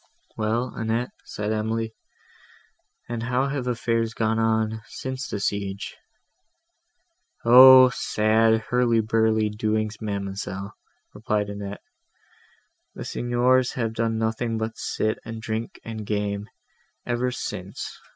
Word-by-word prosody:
"Well, 115 +3 -1
Annette," 115 +2 -1
said 105 +1 -3
Emily, 110 +1 -1 1.1
"and 120 -1 -4
how 125 +3 0
have 135 -3 -3
affairs 115 -2 0
gone 110 0 +1
on, 110 0 +1
since 130 -1 -5
the 100 - -3
siege?" 100 -1 -3 1.5
"O! 130 +2 +10
sad 110 0 +2
hurly 125 -2 +3
burly 110 0 +2
doings, 110 0 -1
ma'amselle," 100 -1 -4 0.4
replied 105 -1 -1
Annette; 100 0 -7 1.1
"the - - -6
Signors 125 +1 +2
have 115 -3 -2
done 115 0 0
nothing 115 +1 -1
but 110 0 -3
sit 110 0 -2
and 115 0 -7
drink 110 +1 -4
and 110 -1 -5
game, 105 0 -2 0.6
ever 120 +1 0
since. 125 - -6
110 Hz, 110 wpm, -25 LUFS, 110-120 Hz, 1.5 s, O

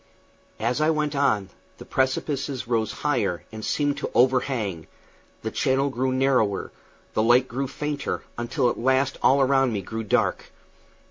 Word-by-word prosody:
As 120 +6 0
I 155 - +3
went 150 -2 0
on, 110 -9 +1 0.3
the - - -11
precipices 135 0 -1
rose 115 -2 0
higher 105 -12 0
and 110 -1 -8
seemed 145 +3 0
to - - -3
overhang, 125 - +1 0.6
the - - -3
channel 135 +1 +1
grew 130 0 0
narrower, 130 -6 +1 0.4
the - - +1
light 120 +3 +4
grew 135 +2 -3
fainter, 145 +1 -3
until 120 +3 0
at - - -6
last 130 +2 +1
all 135 +1 +4
around 135 -1 +3
me 100 -2 -3
grew 110 +4 -5
dark. 105 - +1
130 Hz, 150 wpm, -25 LUFS, 115-140 Hz, 0.6 s, light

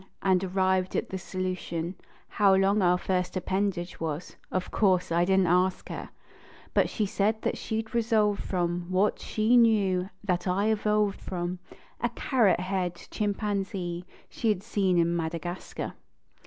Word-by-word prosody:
And 190 -1 +3
arrived 185 0 +1
at - - -1
the 190 - -4
solution 180 -2 -3 0.3
How 200 -2 +4
long 195 +2 +3
our 180 -1 +4
first 180 0 -1
appendage 190 -1 -2
was; 160 +1 -4 0.2
of 185 -1 -2
course, 185 -5 +2
I 170 +1 +3
didn 190 +1 +4
t - - +1
ask 180 +1 +2
her, - - -6 0.6
But - - +3
she 215 - -1
said 215 +2 0
that - - 0
she 220 0 -2
d 220 - -18
resolved 220 -3 +2
from 175 -1 -1
What 190 +3 +2
she 220 +3 +1
knew, 200 -6 +4
that 180 -2 -1
I 195 +4 +2
evolved 210 -1 +1
from 180 0 -4 0.4
A 240 - 0
carrot 225 -7 +2
haired 185 -2 -1 0.2
chimpanzee 195 -4 -2 0.2
she 230 - -2
had 200 -3 0
seen 195 -5 +1
in 170 0 +2
Madagascar. 170 +1 -4
190 Hz, 155 wpm, -28 LUFS, 180-205 Hz, 0.6 s, How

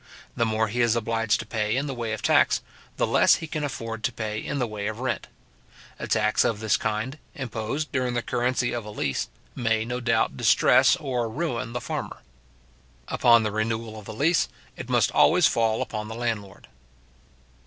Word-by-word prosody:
The 115 - +1
more 110 0 +1
he 120 +4 -1
is 120 -1 +3
obliged 115 -1 0
to - - -9
pay 110 +1 -1
in 140 - 0
the 140 - -3
way 120 -3 -3
of 110 - -4
tax, - - +3 0.3
the - - +2
less - - +5
he 165 - -5
can 155 -1 -4
afford 115 -5 -5
to 125 - +1
pay 110 -2 -4
in 140 - -3
the 125 - +1
way 105 -2 -4
of 110 +1 -4
rent. 130 -1 -2 0.7
A - - -4
tax 105 0 +2
of 110 -3 0
this 110 -2 +2
kind, 115 +8 -2 0.2
imposed 130 +3 -3
during 125 -3 -1
the 120 - -1
currency 125 0 0
of 120 -1 -3
a 105 - -9
lease, 70 -10 -2 0.2
may, 110 -2 0
no 125 +1 -3
doubt, 120 -2 +1
distress 130 +6 +5
or 130 -8 -2
ruin 120 -4 -3
the 120 - -3
farmer. - - -5 0.9
Upon 115 -1 +5
the 110 - -1
renewal 110 +1 -2
of 105 - -13
the 110 - -7
lease, 155 +8 +2 0.3
it - - -8
must - - +3
always - - +5
fall 115 -1 +2
upon 105 -1 -5
the 110 - -6
landlord. 110 -5 -4
115 Hz, 195 wpm, -25 LUFS, 110-125 Hz, 0.9 s, less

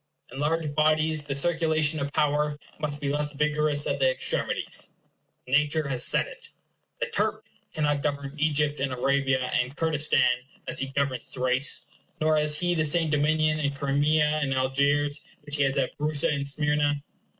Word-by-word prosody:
In 135 - -8
large 155 0 0
bodies 155 0 +2
the 140 -2 -3
circulation 160 0 +1
of 140 0 -3
power 150 0 +1 0.2
must 145 -1 -3
be 140 -1 -2
less 145 0 -1
vigorous 150 0 +1
at 140 - -1
the 135 -1 +4
extremities. 130 - -1 0.6
Nature 150 +3 +2
has 130 -2 0
said - - +3
it. - - -12 0.5
The - - 0
Turk - - -1 0.3
cannot 145 -2 0
govern 140 -1 -3
Egypt 150 -1 +1
and 135 0 -1
Arabia 130 0 0
and 125 +3 0
Kurdistan 155 -5 +2 0.4
as - - -2
he 135 - -1
governs 135 -2 -2
Thrace; 130 +2 0 0.3
nor 155 0 +3
has 150 0 +1
he 175 0 +1
the 160 -2 +1
same 155 +1 +1
dominion 155 +1 +2
in 140 -2 -1
Crimea 150 +2 +2
and 135 -2 0
Algiers 140 +3 +1 0.2
which 145 0 -3
he - - 0
has 135 +1 0
at 135 -2 -1
Brusa 150 0 +1
and 140 -1 -2
Smyrna. 145 0 0
145 Hz, 165 wpm, -26 LUFS, 140-155 Hz, 0.6 s, the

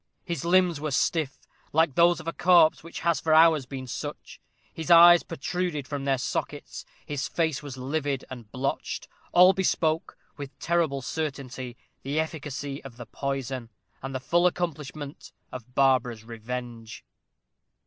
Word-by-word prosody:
His 170 -1 -3
limbs 175 -3 +3
were 155 - -2
stiff, 145 +1 0 0.4
like 160 -2 +3
those 170 +2 +4
of 160 - -10
a 165 - -2
corpse 175 -4 +4
which 170 - -8
has 170 -1 +2
for 155 -1 +2
hours 160 -4 +5
been 130 -1 -6
such; 125 - -7 0.3
his 160 +1 -6
eyes 175 0 +9
protruded 165 -1 -3
from 140 -2 -4
their 135 -1 +2
sockets; 125 - -4 0.2
his 145 -1 -3
face 160 -5 -1
was 140 -3 -8
livid 140 +1 -2
and 120 -5 -9
blotched. 135 +1 -3 0.2
All 180 +2 +7
bespoke, 165 -4 0 0.2
with 140 -1 -8
terrible 165 -6 0
certainty, 130 -5 -5 0.2
the 140 +3 -2
efficacy 145 -3 -4
of 125 -3 -11
the 120 - -8
poison, 135 -3 -4 0.3
and 135 0 -6
the - - -1
full 175 +7 +3
accomplishment 150 -4 -5 0.2
of 125 0 -10
Barbara's 130 -4 +2
revenge. 115 0 -7
145 Hz, 150 wpm, -26 LUFS, 130-165 Hz, 0.4 s, eyes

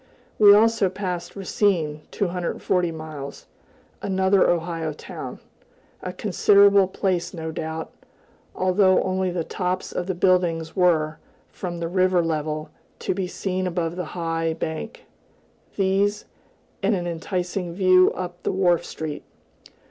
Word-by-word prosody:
We 205 -1 +9
also 215 -1 +5
passed 180 -2 -4
Racine 180 -6 0
(240 180 -1 -1
miles), 155 -3 -8 0.6
another 190 0 +3
Ohio 165 -2 -1
town - - -8 0.6
a 180 - -4
considerable 200 0 +4
place, 185 -1 -1
no 160 -1 -4
doubt, 160 0 -5 0.6
although 185 0 +3
only 185 0 0
the 175 -2 -2
tops 180 +2 -3
of 175 - -3
the 190 - -1
buildings 175 -3 +1
were, 165 -4 +2 0.3
from 175 -2 -5
the 170 0 -3
river 185 0 +2
level, 155 -1 -2 0.3
to - - -2
be 185 0 -2
seen 185 0 -2
above 170 -1 -2
the 180 -1 -3
high 165 -1 -1
bank; 160 - -5 0.7
these, 200 +2 +1 0.6
and 200 +1 +2
an 175 -2 -3
enticing 175 +1 -3
view 185 -1 +5
up 180 -1 -6
the - - -1
wharf 180 -3 +2
street. 155 -2 -6
180 Hz, 125 wpm, -24 LUFS, 165-190 Hz, 0.7 s, We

